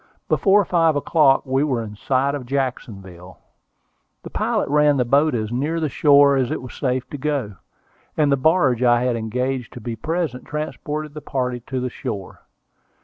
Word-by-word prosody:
Before 200 Hz, 0 st, +3 dB
five 165 Hz, -3 st, +2 dB
o'clock 145 Hz, -1 st, +3 dB
we 135 Hz, +1 st, +1 dB
were 130 Hz, -6 st, -1 dB
in 105 Hz, -1 st, -8 dB
sight 135 Hz, +5 st, 0 dB
of 135 Hz, -4 st, -5 dB
Jacksonville. 100 Hz, -9 st, -5 dB, 0.9 s
The -, -, -9 dB
pilot -, -, -1 dB
ran 150 Hz, 0 st, +3 dB
the 125 Hz, -, +1 dB
boat 140 Hz, +3 st, +3 dB
as 110 Hz, -1 st, -3 dB
near 150 Hz, +7 st, -1 dB
the 155 Hz, -2 st, -1 dB
shore 140 Hz, 0 st, +5 dB
as 130 Hz, -2 st, 0 dB
it -, -, -2 dB
was 125 Hz, -, -10 dB
safe 130 Hz, -2 st, -2 dB
to 145 Hz, -, -6 dB
go, 135 Hz, -9 st, -2 dB, 0.6 s
and 150 Hz, -2 st, +3 dB
the -, -, +5 dB
barge 135 Hz, -3 st, +2 dB
I 120 Hz, -1 st, +3 dB
had 125 Hz, -1 st, 0 dB
engaged 125 Hz, +2 st, -3 dB
to -, -, -8 dB
be 115 Hz, 0 st, -5 dB
present 160 Hz, -3 st, -3 dB
transported 150 Hz, 0 st, -5 dB
the 150 Hz, -, -8 dB
party 125 Hz, -3 st, -2 dB
to 130 Hz, -1 st, -3 dB
the 125 Hz, 0 st, -3 dB
shore. 95 Hz, -4 st, -6 dB
135 Hz, 180 wpm, -21 LUFS, 125-150 Hz, 0.9 s, shore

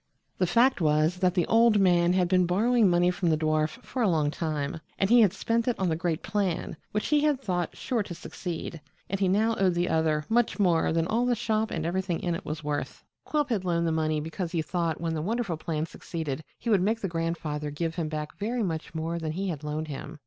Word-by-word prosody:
The 185 Hz, -, +2 dB
fact 235 Hz, +4 st, +3 dB
was 155 Hz, +2 st, +2 dB
that 180 Hz, -1 st, +1 dB
the 175 Hz, -, +2 dB
old 225 Hz, -2 st, +4 dB
man 175 Hz, -2 st, +4 dB
had 180 Hz, -1 st, +2 dB
been 180 Hz, -1 st, +3 dB
borrowing 220 Hz, +4 st, +3 dB
money 175 Hz, +1 st, +3 dB
from 180 Hz, -1 st, -1 dB
the 155 Hz, -, +3 dB
dwarf 155 Hz, +9 st, 0 dB
for 255 Hz, -, -4 dB
a 220 Hz, -, +3 dB
long 155 Hz, -4 st, +1 dB
time, 155 Hz, -2 st, -3 dB, 0.2 s
and 195 Hz, -, +2 dB
had 230 Hz, -6 st, +7 dB
spent 230 Hz, +4 st, -1 dB
it 245 Hz, -, +1 dB
on 190 Hz, -2 st, 0 dB
the 160 Hz, -, +1 dB
great 165 Hz, -1 st, -2 dB
plan, 195 Hz, -5 st, -1 dB, 0.2 s
which 210 Hz, -, -2 dB
he 300 Hz, 0 st, +4 dB
had 295 Hz, -2 st, +2 dB
thought 180 Hz, -8 st, -2 dB
sure 245 Hz, -4 st, -1 dB
to 180 Hz, -4 st, -6 dB
succeed, 170 Hz, -2 st, -6 dB, 0.3 s
and 195 Hz, -, -1 dB
he 195 Hz, -, +2 dB
now 220 Hz, +4 st, +2 dB
owed 185 Hz, -2 st, +3 dB
the 175 Hz, +1 st, +1 dB
other 155 Hz, -2 st, +1 dB
much 235 Hz, +1 st, +2 dB
more 175 Hz, -6 st, +3 dB
than 165 Hz, 0 st, +1 dB
all 230 Hz, +7 st, +1 dB
the 245 Hz, -, +3 dB
shop 220 Hz, -1 st, 0 dB
and 160 Hz, -1 st, -3 dB
everything 180 Hz, 0 st, -1 dB
in 175 Hz, -, -1 dB
it 165 Hz, -, -5 dB
was 155 Hz, +1 st, -5 dB
worth. 145 Hz, -1 st, -3 dB, 0.2 s
Quilp 295 Hz, -2 st, 0 dB
had 215 Hz, -6 st, 0 dB
loaned 170 Hz, -2 st, 0 dB
the 165 Hz, -, +1 dB
money 155 Hz, -1 st, 0 dB
because 165 Hz, +3 st, -4 dB
he 165 Hz, -2 st, 0 dB
thought 170 Hz, -1 st, -1 dB
when 165 Hz, 0 st, -2 dB
the 155 Hz, -, -2 dB
wonderful 215 Hz, 0 st, -1 dB
plan 160 Hz, 0 st, -2 dB
succeeded 160 Hz, -3 st, -5 dB
he 235 Hz, -, -2 dB
would 200 Hz, -4 st, +4 dB
make 220 Hz, +4 st, +1 dB
the 195 Hz, -, -1 dB
grandfather 165 Hz, -3 st, -3 dB
give 160 Hz, +3 st, -3 dB
him 165 Hz, -2 st, -3 dB
back 150 Hz, -1 st, -5 dB
very 230 Hz, +3 st, -1 dB
much 165 Hz, -2 st, -4 dB
more 165 Hz, +1 st, -2 dB
than 155 Hz, -1 st, -3 dB
he 190 Hz, +3 st, -2 dB
had 155 Hz, -4 st, -5 dB
loaned 150 Hz, +1 st, -3 dB
him. 150 Hz, +2 st, -7 dB
175 Hz, 235 wpm, -27 LUFS, 160-205 Hz, 0.3 s, had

